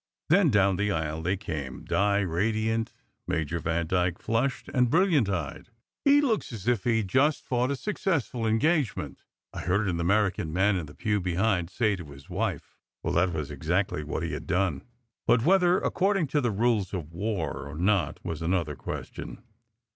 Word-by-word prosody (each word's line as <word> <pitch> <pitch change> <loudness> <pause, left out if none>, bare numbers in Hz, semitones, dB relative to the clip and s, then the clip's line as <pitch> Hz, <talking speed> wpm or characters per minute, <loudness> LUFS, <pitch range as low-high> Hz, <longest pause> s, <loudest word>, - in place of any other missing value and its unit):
Then, 175 0 +5
down 100 -4 +3
the 105 +1 +1
aisle 80 -3 -2
they 90 +4 0
came, 75 -9 -5
Di 100 0 +2
radiant, 110 +5 0 0.4
Major 80 +1 -1
Vandyke 85 +2 0
flushed 120 +4 -1
and 125 -1 +3
brilliant 165 - +3
eyed. 95 +4 -4 0.3
"He 285 0 +6
looks 230 - 0
as 110 -2 -7
if 120 -5 +1
he 115 -2 +3
had 110 -3 -1
just 140 +9 +2
fought 125 0 0
a 140 - 0
successful 140 - -1
engagement," 130 - 0 0.3
I - - -5
heard 95 +4 +1
an 85 -2 -1
American 95 -2 +1
man 95 +4 +2
in 85 -4 -3
the 75 - -13
pew 105 -2 0
behind 90 0 0
say 105 +2 +1
to 85 - -8
his 70 -1 -13
wife. - - -3 0.2
Well, - - -1
that 90 +1 +3
was 75 -3 -4
exactly 85 +1 -1
what 75 - -3
he - - -3
had - - -6
done. 90 -5 +1 0.5
But 115 -1 +4
whether 180 0 +5
according 195 -2 +1
to 145 - +1
the 120 - +1
rules 105 -2 +1
of 85 -3 -6
war 85 -8 -3
or 75 - -8
not 90 -1 +1
was 80 -2 -4
another 85 -3 0
question. 100 - -7
100 Hz, 175 wpm, -27 LUFS, 85-120 Hz, 0.5 s, He